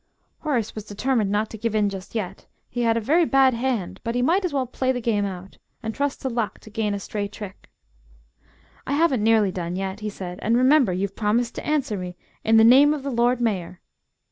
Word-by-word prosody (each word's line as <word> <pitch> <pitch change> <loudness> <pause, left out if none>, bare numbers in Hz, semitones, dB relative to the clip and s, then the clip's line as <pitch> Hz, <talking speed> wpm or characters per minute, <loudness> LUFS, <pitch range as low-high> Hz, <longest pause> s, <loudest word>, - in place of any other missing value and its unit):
Horace 245 -9 -1
was 215 -2 -7
determined 220 +1 0
not 210 +2 0
to 220 - -8
give 225 0 -1
in 210 -1 +3
just 195 +1 -7
yet; 210 -5 -4 0.2
he 245 - -2
had 230 -1 +2
a - - +2
very 310 +10 +3
bad 270 -4 +4
hand, 235 -5 -2
but 230 0 -2
he 245 - +1
might 355 +9 +2
as 360 - -1
well 270 -2 0
play 255 +1 -1
the 250 - -2
game 220 -4 0
out 190 0 -7 0.2
and 220 0 -3
trust 285 +1 -2
to - - 0
luck 235 -4 -2
to 215 - -14
gain 210 -1 -1
a - - -4
stray 205 0 -3
trick. 200 -2 -10 1.2
"I 275 - -1
haven't 285 -6 +2
nearly 220 -2 +3
done 175 -1 -4
yet," 190 +1 -3
he 215 0 -3
said. 185 -2 -7
"And, 230 +1 +2
remember, 260 -3 +4
you've 195 +2 -2
promised 230 +3 0
to - - -6
answer 280 -8 0
me 180 -1 -6 0.3
in 225 0 +4
the 220 - +7
name 275 +6 +7
of 285 - -7
the 280 - -3
Lord 240 +1 +2
Mayor!" 190 -6 -2
225 Hz, 225 wpm, -24 LUFS, 205-260 Hz, 1.2 s, the